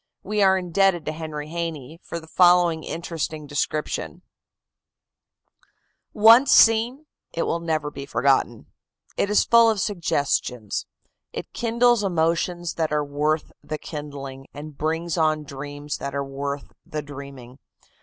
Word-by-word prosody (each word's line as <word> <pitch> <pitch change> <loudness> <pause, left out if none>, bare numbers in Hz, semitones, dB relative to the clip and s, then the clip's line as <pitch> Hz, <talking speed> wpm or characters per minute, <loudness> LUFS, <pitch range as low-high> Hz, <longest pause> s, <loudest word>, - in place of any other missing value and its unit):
We 210 +1 -1
are 190 -1 +5
indebted 180 -1 +1
to - - -1
Henry 155 -1 -6
Haynie 165 -3 -5
for 170 - -6
the 160 - -14
following 175 -1 +4
interesting 160 -2 -4
description: 145 +1 -3 1.9
"Once 230 +5 +7
seen, 230 +6 +5 0.3
it 165 - -1
will 170 - -1
never 155 -3 -2
be 140 -1 -8
forgotten. 135 -5 +1 0.5
It 200 - 0
is 210 - +4
full 235 -1 +6
of 220 -2 0
suggestions. 145 - -1 0.5
It - - -7
kindles 235 -1 +2
emotions 170 -1 0
that 160 -2 0
are 150 -1 +1
worth 150 +2 -1
the 155 - -5
kindling, 140 -3 -8
and 150 0 -8
brings 165 +3 -2
on 155 -1 +2
dreams 145 +1 -6
that 140 0 -5
are 140 0 -1
worth 140 +1 -5
the 150 -1 -5
dreaming. 135 -3 -10
155 Hz, 135 wpm, -24 LUFS, 145-175 Hz, 1.9 s, Once